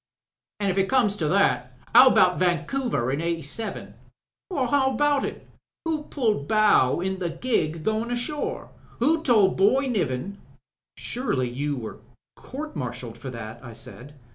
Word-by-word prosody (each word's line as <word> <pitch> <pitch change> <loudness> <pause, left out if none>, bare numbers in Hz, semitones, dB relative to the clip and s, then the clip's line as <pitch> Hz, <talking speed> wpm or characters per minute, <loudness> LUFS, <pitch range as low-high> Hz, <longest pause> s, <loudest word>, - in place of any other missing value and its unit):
"An' 200 -2 +1
if 190 - -1
it 195 - +1
comes 235 -6 +3
to 155 - -1
that 130 -9 +1 0.2
how 250 +3 +9
about 180 -7 +4
Vancouver 175 - 0
in 140 +3 -1
'87?" 170 +5 -4 0.6
"How 265 -4 +1
about 290 -1 +2
it? - - -6 0.4
Who 310 -2 -2
pulled 215 - -1
bow 210 -10 +4
in 190 +1 -2
the 175 -2 -2
gig 165 -4 -1
going 220 +4 -1
ashore? 245 +5 -3 0.3
Who 310 +7 +2
told 220 -10 +3
Boy 215 +9 +3
Niven... 200 - -2 0.3
?" - - -68
"Surely 170 - -2
you 145 +3 -2
were 110 -3 -7 0.4
court 295 +1 -8
martialled 125 -4 -5
for 135 - -7
that?" 115 -1 -8
I 120 -2 -9
said. 125 +5 -10
195 Hz, 150 wpm, -25 LUFS, -, 0.6 s, how